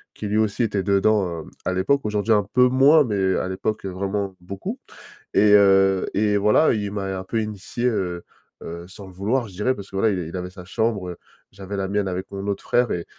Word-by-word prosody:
qui 105 - -5
lui 105 - 0
aussi 110 +2 +1
était 100 -3 -1
dedans, 100 +1 +3 0.2
heu, - - -13 0.2
à 95 - 0
l'époque, 140 +10 +1
aujourd'hui 105 +1 0
un 105 -1 +3
peu 125 0 +6
moins, 140 +4 +6
mais 95 -4 0
à 95 - -2
l'époque, 100 +2 -3
heu, - - -2
vraiment 95 +1 -3
beaucoup. 95 +2 -6 0.6
Et 105 0 +5
heu, 95 -1 +5
et 105 0 +2
voilà, 105 +10 +4
il 105 -2 -2
m'a 95 -2 -3
un 95 - -6
peu 110 +3 -1
initié, 105 +3 -3
heu, 90 -7 -2 0.4
heu, 85 +1 -7
sans 100 +1 -11
le - - -12
vouloir, 110 +6 -1
je - - -15
dirais, 125 +6 0
parce 100 -3 -10
que, 95 - -5
voilà, 110 +2 +3
il 95 - -2
est 85 - -5
il 95 - -6
avait 90 0 -5
sa 90 -1 -11
chambre, 100 -4 -2 0.3
j'avais 100 0 -7
la 95 - -1
mienne 100 0 0
avec 95 +2 -5
mon 100 0 -5
autre 100 -1 -2
frère 120 -1 +2
et 85 - -1
et - - -12
100 Hz, 235 wpm, -23 LUFS, 95-110 Hz, 0.6 s, peu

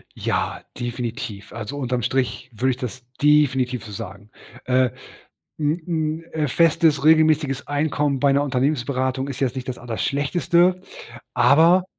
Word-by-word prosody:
Ja, - - -2 0.2
definitiv. 115 -4 -5
Also, 115 +5 -6
unterm 125 -3 -1
Strich 125 +1 -1
würde 130 +4 +1
ich 125 - -4
das 125 0 -6 0.2
definitiv 135 -5 +3
so 105 - -9
sagen. 100 0 -8 0.4
Äh, 130 0 +3 0.7
'n 155 +3 0
'n, 160 -1 -2
äh, 155 -2 0
festes 165 0 +3
regelmäßiges 155 -3 +3
Einkommen 145 -1 0
bei 140 0 +3
'ner 140 +1 +2
Unternehmensberatung 130 -1 -1
ist 135 - -6
jetzt 135 -2 0
nicht 130 -1 -5
das 125 - -5
allerschlechteste, 170 - +1 0.5
aber 165 +8 +5
135 Hz, 135 wpm, -22 LUFS, 125-155 Hz, 0.7 s, aber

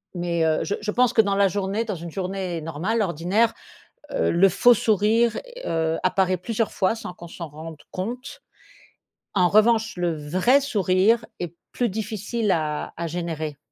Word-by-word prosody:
mais 170 -1 -1
heu, 160 0 +1
je 180 - -1
je 210 0 -2
pense 245 +1 +3
que 220 - +6
dans 200 0 0
la 200 0 +4
journée, 200 +4 -1
dans 210 -4 -3
une 170 0 -7
journée 185 -2 -3
normale, 170 +9 -1
ordinaire, 190 +6 +1 0.6
heu, - - +1
le 190 +3 +5
faux 245 +7 +5
sourire, 220 +2 +2 0.3
heu, 160 0 0
apparaît 185 -1 +2
plusieurs 225 +4 -2
fois 195 +3 +1
sans 180 -5 -7
qu'on 170 -1 -11
s'en 170 -2 -7
rende 155 +1 -9
compte. 240 +8 -5 0.9
En 180 -2 +4
revanche, 220 0 +3
le 170 -2 0
vrai 185 - +2
sourire 210 -1 +2
est 175 -1 -5 0.2
plus 240 -4 0
difficile 215 +1 -2
à 155 -4 -1
à 170 0 -3
générer. 160 -3 -4
190 Hz, 165 wpm, -24 LUFS, 170-220 Hz, 0.9 s, que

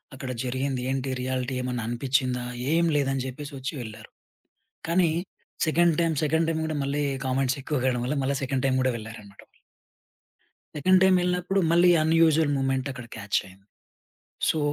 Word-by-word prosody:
అక్కడ 130 -1 -5
జరిగింది 130 0 -2
ఏంటి? 135 0 -2
రియాలిటీ 130 0 -2
ఏమన్నా 125 -3 -3
అనిపించిందా? 125 0 0 0.3
ఏమి 170 0 +3
లేదని 135 -2 0
చెప్పేసి 145 +3 -7
వచ్చి 130 +4 -4
వెళ్లారు. 110 -1 -10 0.8
కానీ 170 -1 +3 0.6
సెకండ్ 170 0 +3
టైమ్, 165 -1 +1
సెకండ్ 160 +2 +2
టైమ్ 160 -1 -1
కూడా 155 -1 -2
మళ్ళీ 140 +2 -1 0.2
కామెంట్స్ 130 0 0
ఎక్కువ 150 0 -1
కావడం 125 -2 +1
వల్ల 145 +3 -1
మళ్ళీ 140 +1 0
సెకండ్ 130 0 -1
టైమ్ 130 -1 +2
కూడా 130 - +2
వెళ్లారన్నమాట. 110 -3 -11 1.3
సెకండ్ 185 +5 +4
టైమ్ 190 -1 +5
వెళ్ళినప్పుడు 180 +2 0
మళ్ళీ 175 +1 +5
అన్యూజువల్ 160 -1 +4
మొమెంట్ 135 0 0
అక్కడ 125 -2 -8
క్యాచ్ 100 -2 -1
అయింది. 95 +1 -18 0.8
సో, 160 - +1
135 Hz, 150 wpm, -26 LUFS, 125-160 Hz, 1.3 s, టైమ్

